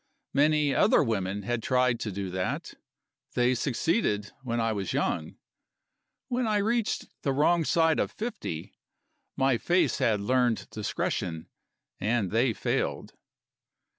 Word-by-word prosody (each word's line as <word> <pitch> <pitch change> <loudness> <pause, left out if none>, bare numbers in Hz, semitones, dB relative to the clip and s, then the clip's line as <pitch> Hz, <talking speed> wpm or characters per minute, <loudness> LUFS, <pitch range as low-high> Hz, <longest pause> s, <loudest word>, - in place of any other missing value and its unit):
Many 150 0 +3
other - - +4
women 100 -4 -2
had 120 +2 -1
tried 125 -1 +2
to 110 - -3
do 95 -1 -4
that. 90 0 -3 0.6
They 125 +1 +3
succeeded 120 - 0
when 120 -3 -2
I 115 -1 +1
was 100 -3 -3
young. 80 -2 -1 0.9
When 245 -1 0
I 215 - +1
had 205 - +2
reached 230 0 0 0.2
the 140 - 0
wrong 160 +5 +3
side 160 0 +3
of - - +1
fifty, 210 - -5 0.6
my 135 -3 +2
face 175 -6 +2
had 105 -2 +2
learned 120 +2 +1
discretion, 85 -5 -3 0.5
and 105 -3 0
they 115 +3 +3
failed. - - -2
120 Hz, 135 wpm, -28 LUFS, 105-150 Hz, 0.9 s, other